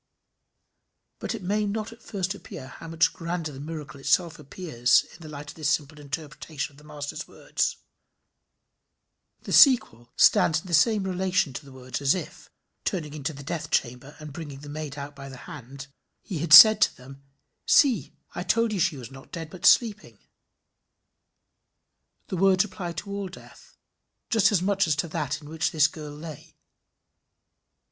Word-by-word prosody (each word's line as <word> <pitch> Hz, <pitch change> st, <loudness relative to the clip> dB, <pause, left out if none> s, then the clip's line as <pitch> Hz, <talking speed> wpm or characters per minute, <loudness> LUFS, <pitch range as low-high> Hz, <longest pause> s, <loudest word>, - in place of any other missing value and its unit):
But -, -, -3 dB
it 210 Hz, -, -8 dB
may 205 Hz, +3 st, 0 dB
not 215 Hz, +2 st, -4 dB
at 230 Hz, -, -19 dB
first 195 Hz, -3 st, -3 dB
appear 200 Hz, -9 st, -10 dB
how 165 Hz, -, -11 dB
much 165 Hz, 0 st, +2 dB
grander 170 Hz, -3 st, -4 dB
the 135 Hz, -, -10 dB
miracle 150 Hz, -2 st, -7 dB
itself 165 Hz, +3 st, +1 dB
appears 135 Hz, -5 st, +1 dB
in -, -, -13 dB
the 155 Hz, -, -10 dB
light 150 Hz, 0 st, -8 dB
of -, -, -17 dB
this 155 Hz, -2 st, -1 dB
simple 150 Hz, 0 st, -1 dB
interpretation 145 Hz, 0 st, -6 dB
of -, -, -21 dB
the -, -, -18 dB
Master's 150 Hz, -1 st, -7 dB
words. -, -, -2 dB, 1.6 s
The -, -, -6 dB
sequel 220 Hz, -, +5 dB
stands 160 Hz, -1 st, +5 dB
in -, -, -21 dB
the 175 Hz, -, -7 dB
same 205 Hz, +6 st, +4 dB
relation 185 Hz, -5 st, 0 dB
to 125 Hz, -, -7 dB
the 140 Hz, -, -14 dB
words 130 Hz, +1 st, -6 dB
as 140 Hz, +3 st, +3 dB
if 185 Hz, -, -8 dB, 0.3 s
turning 155 Hz, -7 st, -3 dB
into 150 Hz, 0 st, -4 dB
the 140 Hz, -1 st, -10 dB
death 150 Hz, 0 st, -4 dB
chamber, 125 Hz, +3 st, -2 dB
and 150 Hz, -2 st, -9 dB
bringing 145 Hz, -4 st, -8 dB
the 145 Hz, -, -10 dB
maid 150 Hz, -1 st, -6 dB
out 145 Hz, +1 st, -7 dB
by 140 Hz, 0 st, -9 dB
the 135 Hz, -, -10 dB
hand 135 Hz, -1 st, -9 dB, 0.4 s
he 180 Hz, -6 st, -5 dB
had 165 Hz, 0 st, -3 dB
said 215 Hz, +7 st, +11 dB
to -, -, +3 dB
them: 135 Hz, +2 st, -13 dB, 0.5 s
"See 245 Hz, -, +3 dB, 0.2 s
I -, -, -4 dB
told 230 Hz, +4 st, +1 dB
you 200 Hz, -, -2 dB
she 165 Hz, -3 st, +1 dB
was 125 Hz, 0 st, -9 dB
not 135 Hz, 0 st, -14 dB
dead 165 Hz, -2 st, -7 dB
but 185 Hz, -, 0 dB
sleeping." 220 Hz, -3 st, +3 dB, 2.1 s
The 185 Hz, -, -3 dB
words 190 Hz, 0 st, +4 dB
apply 185 Hz, -3 st, -6 dB
to 200 Hz, +5 st, -7 dB
all 200 Hz, -1 st, -3 dB
death, 185 Hz, -, -15 dB, 0.5 s
just 220 Hz, -2 st, +4 dB
as 185 Hz, -4 st, +1 dB
much 195 Hz, -1 st, +1 dB
as 155 Hz, -, +2 dB
to 150 Hz, +4 st, -2 dB
that 150 Hz, 0 st, -3 dB
in -, -, -11 dB
which 160 Hz, +1 st, -1 dB
this 155 Hz, -3 st, +4 dB
girl 155 Hz, -1 st, -9 dB
lay. 155 Hz, -1 st, -10 dB
155 Hz, 175 wpm, -26 LUFS, 145-185 Hz, 2.1 s, said